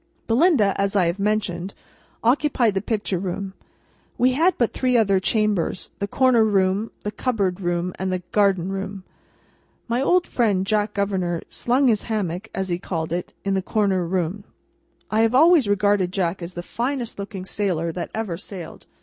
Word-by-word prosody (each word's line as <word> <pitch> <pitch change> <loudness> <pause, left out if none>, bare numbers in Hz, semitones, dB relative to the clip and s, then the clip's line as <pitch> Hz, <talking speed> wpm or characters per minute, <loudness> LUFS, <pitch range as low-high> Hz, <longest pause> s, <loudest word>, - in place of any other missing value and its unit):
Belinda, 235 - +3
as 200 +1 0
I 190 -3 +4
have 170 +4 -1
mentioned, 200 -3 -1 0.5
occupied 245 -2 +2
the 195 - -1
Picture 205 -4 -1
Room. 190 +1 -4 0.6
We 255 +1 +4
had 325 +7 +2
but 235 - +1
three 255 -1 +2
other 200 -4 +3
chambers: 205 -2 0
the 200 - -1
Corner 255 -1 +4
Room, 200 +1 +1
the 210 - -2
Cupboard 200 -5 -1
Room, 175 0 -1
and 190 0 -1
the 185 -1 -2
Garden 195 -3 +2
Room. 195 0 -5 0.8
My 240 +2 0
old 355 +5 +3
friend, 205 -6 +1
Jack 210 0 0
Governor, 190 -4 -1
"slung 260 +3 +1
his 220 -4 +3
hammock," 200 -2 -2
as 190 -1 -3
he 175 0 -1
called 165 -3 -3
it, 175 0 -3
in 195 - +1
the 190 - +1
Corner 195 -2 +1
Room. 180 +3 -2 0.7
I 215 - +2
have 225 +2 +3
always 315 -3 +6
regarded 205 -2 +2
Jack 185 -1 -1
as 170 +1 -7
the 175 - -5
finest 240 +1 -3
looking 195 -2 -6
sailor 180 -5 -1
that 175 +1 -5
ever 215 -7 -3
sailed. 185 -2 -9
200 Hz, 170 wpm, -23 LUFS, 185-225 Hz, 0.8 s, always